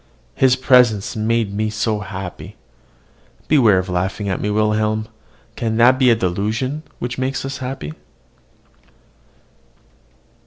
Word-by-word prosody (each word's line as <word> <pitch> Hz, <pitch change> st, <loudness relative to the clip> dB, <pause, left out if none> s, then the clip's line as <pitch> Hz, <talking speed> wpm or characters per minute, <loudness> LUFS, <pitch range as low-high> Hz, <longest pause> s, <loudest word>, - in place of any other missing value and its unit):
His 130 Hz, -, +3 dB
presence 125 Hz, -5 st, +3 dB
made 110 Hz, -1 st, 0 dB
me 110 Hz, +1 st, -1 dB
so 110 Hz, 0 st, -1 dB
happy! 95 Hz, -2 st, -7 dB, 0.9 s
Beware 120 Hz, -10 st, +4 dB
of 95 Hz, 0 st, -1 dB
laughing 95 Hz, +3 st, -2 dB
at 95 Hz, -, -2 dB
me, 105 Hz, -, -1 dB
Wilhelm. 110 Hz, +1 st, 0 dB, 0.5 s
Can 110 Hz, -1 st, -2 dB
that 125 Hz, +3 st, +5 dB
be 130 Hz, -2 st, +5 dB
a 115 Hz, -, +5 dB
delusion 110 Hz, -, -2 dB, 0.2 s
which 125 Hz, +2 st, -5 dB
makes 135 Hz, +1 st, -2 dB
us 135 Hz, 0 st, -5 dB
happy? 125 Hz, -, -5 dB
110 Hz, 120 wpm, -19 LUFS, 100-125 Hz, 0.9 s, that